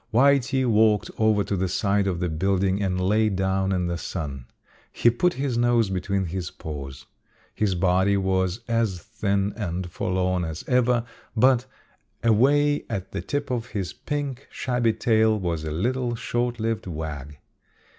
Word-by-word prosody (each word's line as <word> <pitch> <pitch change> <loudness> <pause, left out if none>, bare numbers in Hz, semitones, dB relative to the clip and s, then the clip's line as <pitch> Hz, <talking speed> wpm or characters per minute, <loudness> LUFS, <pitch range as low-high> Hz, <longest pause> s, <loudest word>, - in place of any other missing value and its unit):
Whitey 135 +1 +3
walked 110 -2 +3
over 110 -2 +3
to 100 - -2
the 95 0 0
side 100 +2 +1
of 90 -3 -1
the 90 - 0
building 95 +4 0
and 95 -2 0
lay 105 +4 +2
down 95 0 0
in 90 -2 0
the 85 0 -2
sun. 70 -10 -5 0.4
He 120 - +3
put 175 +10 +1
his 130 -3 -1
nose 120 -4 +3
between 95 +1 -1
his 90 0 -4
paws. 70 -3 -8 0.5
His 100 -3 0
body 95 +2 +2
was 95 +1 0
as 115 -6 0
thin 100 +2 -1
and 90 -4 -4
forlorn 90 0 0
as 80 -1 -5
ever, 125 -2 +2 0.3
but 130 +1 +4 0.6
away 145 +6 +3
at 95 -5 -4
the - - -3
tip 145 +8 -3
of 120 -1 -2
his 100 -9 -4
pink, 145 -3 -4
shabby 125 -3 0
tail 110 -1 +2
was 85 -4 -2
a 80 - -3
little, 120 +8 -1
short 120 +1 -2
lived 115 -2 -2
wag. 75 -4 -6
100 Hz, 155 wpm, -25 LUFS, 90-120 Hz, 0.6 s, but